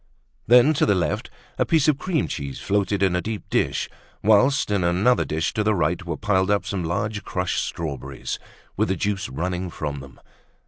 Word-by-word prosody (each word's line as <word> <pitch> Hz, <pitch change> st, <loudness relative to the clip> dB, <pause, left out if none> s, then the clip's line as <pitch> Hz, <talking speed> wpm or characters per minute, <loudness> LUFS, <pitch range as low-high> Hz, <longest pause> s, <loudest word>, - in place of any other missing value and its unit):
Then, 125 Hz, +6 st, +7 dB
to -, -, +4 dB
the 100 Hz, -, +4 dB
left, 85 Hz, -3 st, -1 dB, 0.3 s
a -, -, +5 dB
piece 160 Hz, -3 st, +3 dB
of 150 Hz, -2 st, +3 dB
cream 180 Hz, -5 st, 0 dB
cheese 70 Hz, -1 st, -5 dB
floated 100 Hz, 0 st, 0 dB
in 95 Hz, -2 st, +3 dB
a 90 Hz, -, +1 dB
deep 110 Hz, +1 st, -5 dB
dish; -, -, +1 dB, 0.4 s
whilst 110 Hz, +5 st, +4 dB
in 100 Hz, -3 st, +1 dB
another 95 Hz, +9 st, +3 dB
dish 80 Hz, +1 st, -2 dB
to 105 Hz, -, 0 dB
the 105 Hz, 0 st, +2 dB
right, 85 Hz, +1 st, 0 dB
were 85 Hz, -3 st, -4 dB
piled 95 Hz, -2 st, +1 dB
up 105 Hz, -1 st, +2 dB
some 95 Hz, -3 st, -2 dB
large 105 Hz, +6 st, -2 dB
crushed 90 Hz, -1 st, -1 dB
strawberries, 70 Hz, -5 st, -5 dB, 0.4 s
with -, -, +1 dB
the 95 Hz, -, 0 dB
juice 100 Hz, +1 st, -2 dB
running 90 Hz, +6 st, -3 dB
from 75 Hz, -3 st, -4 dB
them. 70 Hz, -2 st, -13 dB
95 Hz, 190 wpm, -23 LUFS, 85-105 Hz, 0.4 s, Then